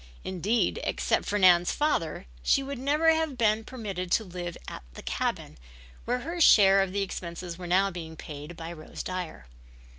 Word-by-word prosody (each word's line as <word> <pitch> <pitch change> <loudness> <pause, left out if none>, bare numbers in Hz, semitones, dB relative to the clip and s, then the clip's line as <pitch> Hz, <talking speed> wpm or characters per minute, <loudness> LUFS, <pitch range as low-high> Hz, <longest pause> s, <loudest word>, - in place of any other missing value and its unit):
Indeed, 195 +6 0
except - - 0
for 205 - 0
Nan's 180 -3 +5
father, 295 - -1 0.2
she 275 - +3
would 275 -1 -5
never 300 +5 +3
have 320 -4 -1
been 220 -1 +2
permitted 200 -7 -5
to 225 - +3
live 175 -3 -6
at - - -7
the - - -10
cabin, - - -3 0.5
where 245 +1 -1
her 335 +5 -4
share 195 -8 +7
of 195 -1 -1
the 200 +1 0
expenses 175 -2 -6
were 180 - -6
now 195 +3 +3
being 165 -2 -7
paid 150 +2 -9
by 165 +1 -6
Rose 155 -2 -8
Dyer. 180 - -5
190 Hz, 175 wpm, -28 LUFS, 175-240 Hz, 0.5 s, share